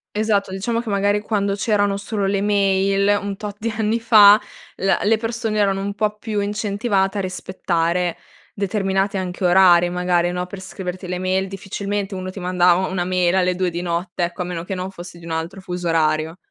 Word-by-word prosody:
Esatto, 210 -2 +1
diciamo, 230 +5 -2
che, 235 - -7
magari, 205 +1 +1
quando 205 -2 -1
c'erano 205 -1 +1
solo 200 0 -3
le 195 0 0
mail 200 0 +2
un 200 -1 -4
tot 205 -1 -6
di 230 - -2
anni 220 +1 +1
fa, 210 -2 +7 0.4
l 195 - -4 0.2
le 220 +2 +3
persone 225 -1 -2
erano 195 -1 +1
un 200 +1 -3
po' 210 0 -1
più 210 -1 -3
incentivate 205 -1 -1
a - - 0
rispettare 180 -2 -1 0.4
determinati 195 0 0
anche 185 0 -3
orari 175 -1 +6
magari, 175 -1 +1
no, 180 0 -3
per 190 +1 -8
scriverti 185 -1 -6
le 180 0 -3
mail. 185 +1 0
Difficilmente, 200 +1 -4
uno 185 0 -5
ti 195 - -8
mandava 180 0 +2
una 180 -2 -2
mail 180 0 +1
alle 180 -1 +2
2 185 0 0
di 170 0 -4
notte, 175 0 -2
ecco, 175 +2 -3
a 180 - -2
meno 175 -2 -4
che 190 - -5
non 185 0 -4
fossi 175 -2 -11
di 170 - -13
un 165 - -6
altro 165 +4 -4
fuso 180 -1 -4
orario. 160 0 +1
195 Hz, 195 wpm, -21 LUFS, 180-205 Hz, 0.4 s, fa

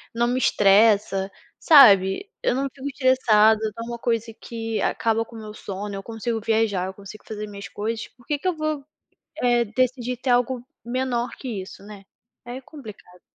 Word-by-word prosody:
não 235 +1 +2
me 250 +1 0
estressa, 200 -3 +3 0.3
sabe, 220 - +6
eu 245 - +1
não 275 +1 -1
fico 275 0 -7
estressada, 230 -6 +4 0.2
não 230 - -5
é - - -8
uma 235 0 -5
coisa 230 -1 -1
que 225 -1 -5
acaba 225 0 0
com 230 - -15
o - - -8
meu 215 -1 -9
sono, 200 0 -6
eu 195 - -5
consigo 225 0 -3
viajar, 215 -4 0
eu 190 - -6
consigo 200 +2 -12
fazer 215 -1 -6
minhas 200 -1 -9
coisas, 225 +2 -4
por 240 - -22
que 295 -2 -2
que 370 - -3
eu 360 - +1
vou, 310 -2 -3 0.6
eh, 240 -1 +3
decidir 250 +2 -1
ter 255 0 -2
algo 245 0 +1 0.2
menor 245 0 -2
que 260 - -7
isso, 190 - -12
né. 200 -1 -12 0.4
É 245 +2 -7
complicado. 215 - -13
230 Hz, 185 wpm, -23 LUFS, 210-250 Hz, 0.6 s, sabe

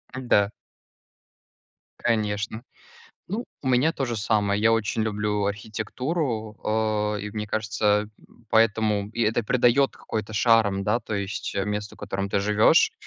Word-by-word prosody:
Ну 130 - -4
да. 100 -3 +4 1.5
Конечно. 110 0 -1 0.7
Ну, 215 +7 -3 0.2
у 135 - -2
меня 130 +6 +3
то 135 - -2
же 120 -2 -3
самое. 105 -2 +1
Я 115 +1 +4
очень 115 0 0
люблю 105 -1 -1
архитектуру, 110 - -3 0.6
э, - - -4
и 105 - -5
мне 105 0 -4
кажется, 105 -1 +1 0.4
поэтому 110 -2 +2
и 115 +1 -2
это 115 +2 +1
придаёт 125 +4 +3
какой-то 110 0 -5
шарм, 110 -3 +3
да, 105 +4 +1
то 110 -1 -5
есть 100 0 -4
месту, 105 0 -4
в - - -27
котором 100 +1 -3
ты 100 - 0
живешь. 105 +9 +4
110 Hz, 140 wpm, -25 LUFS, 105-115 Hz, 1.5 s, да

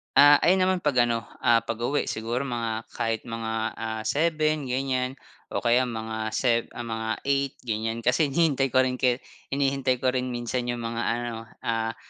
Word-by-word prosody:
Ah, 145 +1 +9
ayun 185 +3 +5
naman 185 -3 0
'pag 125 -5 +3
ano, 115 -1 -1 0.2
ah, 115 -2 +4
pag-uwi. 120 +5 -1
Siguro 115 +4 -2
mga 115 -3 -2
kahit 115 -1 -2
mga, 115 -1 -4 0.3
ah, 110 -1 -3
7 155 -1 +1
ganyan. 130 0 -1 0.3
O - - -3
kaya 125 +2 +3
mga 110 -1 -4
sev 120 -2 +2
ah, 120 - -4
mga 110 -1 -3
8 140 -1 0
ganyan. 115 0 -2
Kasi 130 +5 +3
hinihintay 140 -2 +2
ko 130 - +6
rin 125 0 -2
kaya 125 0 +1 0.3
hinihintay 135 -2 +1
ko 130 - +4
rin 130 0 -1
minsan 120 0 -2
yung 120 -1 -2
mga 115 0 -3
ano, 115 -1 -3 0.2
ah, 115 0 -1
120 Hz, 175 wpm, -26 LUFS, 115-135 Hz, 0.3 s, Ah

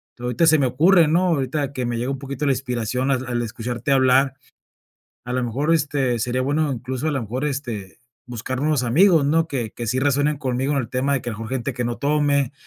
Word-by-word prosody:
to 120 - -13
ahorita 125 +7 +2
se 155 0 +6
me 135 - +2
ocurre, 165 +7 +4
¿no? 175 +4 +2
Ahorita 145 -3 -1
que 130 -2 -3
me 120 -1 -2
llega 120 +3 -2
un 135 - -3
poquito 140 +1 -4
la 140 - +3
inspiración 125 0 -2
al 130 -1 0
al 120 -1 -1
escucharte 120 +4 -4
hablar. 130 0 +4 0.9
A 125 - -4
lo 130 - 0
mejor, 140 +7 0
este, 140 -5 0
sería 125 +2 -1
bueno 145 +2 0
incluso 130 +4 -3
a - - 0
lo 135 - -1
mejor, 125 +6 -4
este, 120 -9 -5 0.3
buscar 125 +2 -4
nuevos 150 -2 +1
amigos, 160 +5 +4
¿no? 160 +3 +2
Que 120 -7 -3
que 120 - -6
sí 130 +4 0
resuenen 145 +2 +1
conmigo 135 0 -1
en 140 - +1
el 120 -4 -3
tema 135 +2 0
de 135 - 0
que 120 - -4
a - - -4
lo - - -10
mejor 115 +1 -6
gente 130 0 -2
que 125 0 -2
no 120 0 -3
tome, 145 -2 +1
130 Hz, 235 wpm, -22 LUFS, 125-145 Hz, 0.9 s, se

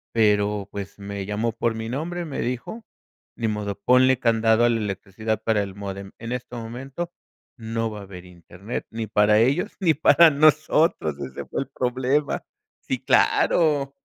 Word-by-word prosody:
Pero, 105 -2 +2
pues, 100 -1 -7
me 100 -1 -6
llamó 105 +3 -1
por 115 0 -1
mi 110 0 -5
nombre, 170 +7 -3
me 145 -4 -5
dijo: 125 - -4 0.5
"Ni 115 - -2
modo, 105 -2 -3
ponle 125 +3 +4
candado 115 -1 +3
a - - +4
la 115 - +1
electricidad 105 +1 -3
para 110 -2 +2
el 100 -1 -8
módem. 100 -1 -7
En 115 0 -7
este 125 0 -5
momento 130 +9 -6 0.5
no 115 -1 -3
va 105 - -7
a - - -9
haber 90 -2 -11
Internet 90 +5 -8
ni 115 -1 -5
para 105 0 +4
ellos 135 - +1
ni 175 -5 +3
para 165 +2 +6
nosotros", 155 - +3
ese 65 0 -6
fue - - -3
el 135 - -6
problema 130 +2 -1 0.4
Sí, - - -3
claro. 145 -4 +2
115 Hz, 165 wpm, -24 LUFS, 105-135 Hz, 0.5 s, para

